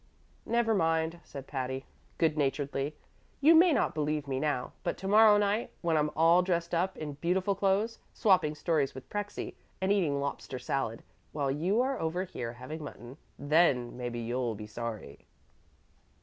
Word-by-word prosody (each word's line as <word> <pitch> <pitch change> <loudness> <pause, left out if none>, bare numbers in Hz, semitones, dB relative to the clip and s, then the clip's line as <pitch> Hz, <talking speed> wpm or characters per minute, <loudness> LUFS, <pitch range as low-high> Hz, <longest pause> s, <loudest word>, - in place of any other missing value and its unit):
"Never 235 -1 +2
mind," 165 -2 +1
said 140 -3 -9
Patty, 130 -1 -4 0.3
good 160 -2 +2
naturedly; 140 0 -1 0.4
"you 305 +4 +7
may 340 +2 +7
not - - +1
believe 150 -1 -1
me 130 -1 -1
now, 145 -4 -1
but - - -2
to 190 - -6
morrow 210 +1 +7
night, 205 +2 +1
when 170 -2 +1
I'm 150 -1 +2
all 165 +3 +5
dressed 170 -2 -1
up 180 +3 0
in 150 -2 -5
beautiful 185 +3 +1
clothes, 200 +4 0
swapping 185 -7 +3
stories 150 -5 0
with 130 - -9
Prexy 205 0 -4 0.3
and 190 +1 +1
eating 165 -9 +2
lobster 140 -2 -4
salad, 125 -2 -3 0.3
while 140 -3 0
you 180 - +1
are 265 +1 -1
over 165 +3 -1
here 120 -10 -5
having 130 +6 -7
mutton, 125 -3 -9 0.2
then 145 -5 +2
maybe 120 -1 -4
you'll 120 0 -2
be 105 +1 -7
sorry." 110 -9 -7
155 Hz, 165 wpm, -30 LUFS, 135-190 Hz, 0.4 s, you